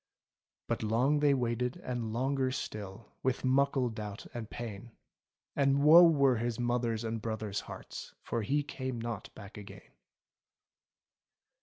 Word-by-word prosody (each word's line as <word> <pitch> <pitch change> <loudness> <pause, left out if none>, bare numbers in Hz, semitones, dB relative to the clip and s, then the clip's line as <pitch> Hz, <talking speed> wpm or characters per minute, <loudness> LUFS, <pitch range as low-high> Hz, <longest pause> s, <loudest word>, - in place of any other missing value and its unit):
But - - -1
long 120 +7 +2
they 145 -1 +4
waited, 125 0 -1
and 120 -3 -4
longer 130 +3 0
still. 105 -4 -6
With 130 0 0
muckle 135 -1 +3
doubt 105 -2 -6
and 115 -2 -6
pain. 115 -1 -7 0.6
And 140 0 +3
woe 160 +4 +10
were 140 -5 +4
his 120 0 -2
mother's 120 -2 0
and 115 -1 -3
brother's 110 -3 -3
heartSy - - -9
For 115 - -2
he 145 +7 +1
came 130 -4 -4
not 115 -2 -5
back 105 0 -10
again. 100 -1 -12
120 Hz, 135 wpm, -32 LUFS, 110-135 Hz, 0.6 s, woe